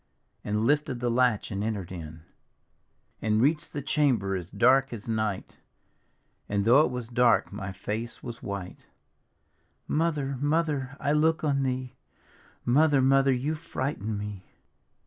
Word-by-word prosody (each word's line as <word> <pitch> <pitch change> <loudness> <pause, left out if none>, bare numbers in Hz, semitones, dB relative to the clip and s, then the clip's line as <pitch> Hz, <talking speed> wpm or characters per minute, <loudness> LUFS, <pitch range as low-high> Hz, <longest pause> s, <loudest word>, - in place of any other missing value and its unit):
And 105 +1 -1
lifted 145 -2 +1
the 120 -1 0
latch 120 -4 +1
and 100 0 -2
enter'd 105 -5 -3
in, 80 -3 -8 1.0
And 110 0 +1
reached 150 +5 +1
the 145 - -5
chamber 120 -12 +1
as 90 -2 -5
dark 135 +2 +3
as 115 -3 -7
night, 110 -3 -2 0.9
And 100 -1 0
though 130 +6 +6
it - - +1
was 125 -2 -5
dark, 120 -3 +2
my 100 -1 -5
face 110 +5 -5
was 120 -2 -7
white: 100 -3 -7 1.0
"Mother, 150 -4 0
Mother, 145 -3 0
I 140 - 0
look 160 +2 +2
on 140 -2 +1
thee! 130 -1 -2 0.7
Mother, 140 +1 +4
Mother, 135 +1 +4
you 130 +5 0
frighten 130 -8 -3
me! 100 -2 -6
125 Hz, 140 wpm, -27 LUFS, 105-140 Hz, 1.0 s, though